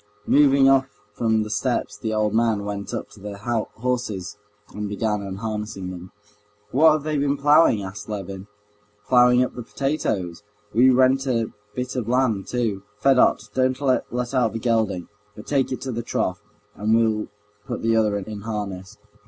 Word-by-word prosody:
Moving 140 Hz, -2 st, +5 dB
off 135 Hz, -1 st, +4 dB, 0.3 s
from 110 Hz, 0 st, +1 dB
the 105 Hz, -, -7 dB
steps, 105 Hz, -1 st, -1 dB
the 110 Hz, +2 st, -4 dB
old 110 Hz, -1 st, 0 dB
man 110 Hz, -3 st, +1 dB
went 100 Hz, -1 st, -5 dB
up -, -, -5 dB
to 105 Hz, -, -15 dB
the 100 Hz, 0 st, -7 dB
horses 110 Hz, -2 st, -3 dB, 0.4 s
and 105 Hz, 0 st, -4 dB
began 105 Hz, 0 st, -1 dB
unharnessing 100 Hz, -1 st, -5 dB
them. 90 Hz, 0 st, -9 dB, 0.6 s
"What 155 Hz, +4 st, +6 dB
have 155 Hz, -2 st, -1 dB
they 155 Hz, -1 st, -1 dB
been 140 Hz, 0 st, +1 dB
ploughing?" 145 Hz, -6 st, +4 dB
asked 95 Hz, +3 st, -8 dB
Levin. 100 Hz, -1 st, -6 dB, 0.6 s
"Ploughing 125 Hz, 0 st, +5 dB
up 125 Hz, -, -3 dB
the 120 Hz, -, -6 dB
potatoes. 110 Hz, -, -2 dB, 0.3 s
We 125 Hz, +4 st, +6 dB
rent 130 Hz, +1 st, +3 dB
a 115 Hz, -3 st, 0 dB, 0.2 s
bit 125 Hz, +1 st, -4 dB
of 120 Hz, -3 st, -2 dB
land 120 Hz, -6 st, +1 dB
too. 115 Hz, -6 st, -1 dB, 0.2 s
Fedot, 135 Hz, +3 st, +4 dB
don't 130 Hz, 0 st, +1 dB
let 125 Hz, -2 st, -1 dB
out 125 Hz, -4 st, +2 dB
the -, -, -2 dB
gelding, 110 Hz, -7 st, 0 dB, 0.3 s
but 105 Hz, -, -10 dB
take 135 Hz, -3 st, 0 dB
it 130 Hz, -, -3 dB
to 130 Hz, -, -4 dB
the 120 Hz, 0 st, -3 dB
trough, 95 Hz, -4 st, -2 dB, 0.3 s
and 110 Hz, +2 st, +1 dB
we'll 110 Hz, -2 st, +1 dB, 0.4 s
put -, -, -4 dB
the 115 Hz, 0 st, +2 dB
other 105 Hz, -2 st, +2 dB
in 100 Hz, +1 st, -6 dB
harness." 105 Hz, -2 st, -5 dB
115 Hz, 170 wpm, -23 LUFS, 105-130 Hz, 0.6 s, What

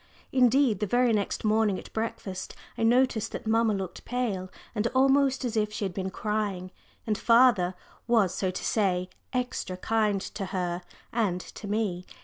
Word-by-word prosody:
Indeed, 255 Hz, -4 st, +4 dB
the 210 Hz, -, -1 dB
very 245 Hz, +2 st, +3 dB
next 205 Hz, -2 st, -1 dB
morning 215 Hz, -2 st, +3 dB
at -, -, -11 dB
breakfast 215 Hz, -4 st, -4 dB, 0.2 s
I -, -, -6 dB
noticed 240 Hz, -1 st, +2 dB
that -, -, -5 dB
mamma 220 Hz, -1 st, +3 dB
looked 190 Hz, -2 st, -5 dB
pale 215 Hz, -7 st, -2 dB, 0.2 s
and 220 Hz, 0 st, 0 dB
almost 270 Hz, 0 st, +3 dB
as 235 Hz, -2 st, -2 dB
if 210 Hz, -1 st, +1 dB
she 210 Hz, -, -3 dB
had 190 Hz, -, -3 dB
been 190 Hz, 0 st, -3 dB
crying, 200 Hz, -2 st, -2 dB, 0.3 s
and 215 Hz, -, 0 dB
father 230 Hz, -6 st, +4 dB, 0.3 s
was, 220 Hz, -7 st, +3 dB
so 190 Hz, -, -1 dB
to 185 Hz, -, -4 dB
say, 185 Hz, -4 st, +1 dB, 0.2 s
"extra" 250 Hz, -7 st, -2 dB
kind 210 Hz, 0 st, +1 dB
to 195 Hz, +1 st, -5 dB
her 180 Hz, -2 st, -2 dB, 0.3 s
and 205 Hz, -6 st, +1 dB
to 205 Hz, -, -9 dB
me. 200 Hz, -4 st, -1 dB
215 Hz, 165 wpm, -28 LUFS, 190-235 Hz, 0.3 s, Indeed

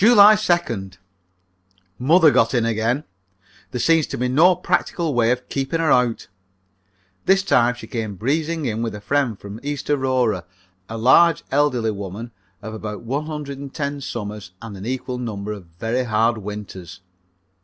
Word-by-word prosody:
July 215 Hz, -2 st, +8 dB
2nd. 165 Hz, -, -1 dB, 1.0 s
Mother 155 Hz, +4 st, +5 dB
got 115 Hz, 0 st, +3 dB
in 120 Hz, -2 st, +2 dB
again. 115 Hz, +5 st, 0 dB, 0.7 s
There 125 Hz, -, -4 dB
seems 165 Hz, +2 st, +3 dB
to -, -, -5 dB
be 125 Hz, -, 0 dB
no 170 Hz, +8 st, +5 dB
practical 170 Hz, -2 st, -1 dB
way 120 Hz, -2 st, +3 dB
of 125 Hz, +1 st, -1 dB
keeping 135 Hz, +4 st, -2 dB
her 160 Hz, -2 st, +2 dB
out. 125 Hz, -2 st, +2 dB, 1.0 s
This 195 Hz, 0 st, +4 dB
time 125 Hz, -10 st, +3 dB
she 120 Hz, -, -10 dB
came 110 Hz, -4 st, -4 dB
breezing 155 Hz, -, -1 dB
in 115 Hz, -2 st, -2 dB
with 115 Hz, -2 st, -3 dB
a -, -, -7 dB
friend 130 Hz, -1 st, 0 dB
from 100 Hz, +2 st, -9 dB
East 145 Hz, 0 st, -3 dB
Aurora, 130 Hz, -9 st, +1 dB, 0.5 s
a 115 Hz, -, -5 dB
large, 150 Hz, +8 st, +5 dB
elderly 130 Hz, -5 st, +2 dB
woman 100 Hz, +3 st, -7 dB, 0.3 s
of 110 Hz, -, -6 dB
about 105 Hz, -1 st, -6 dB
one 140 Hz, +6 st, -3 dB
hundred 145 Hz, -3 st, -5 dB
and 140 Hz, -1 st, -7 dB
ten 140 Hz, 0 st, -3 dB
summers 105 Hz, -6 st, -6 dB
and 115 Hz, -3 st, -8 dB
an 95 Hz, +3 st, -7 dB
equal 125 Hz, 0 st, -3 dB
number 105 Hz, -4 st, -4 dB
of 100 Hz, -5 st, -8 dB
very 120 Hz, +5 st, -1 dB
hard 115 Hz, 0 st, +1 dB
winters. 100 Hz, -4 st, -8 dB
125 Hz, 165 wpm, -21 LUFS, 110-145 Hz, 1.0 s, July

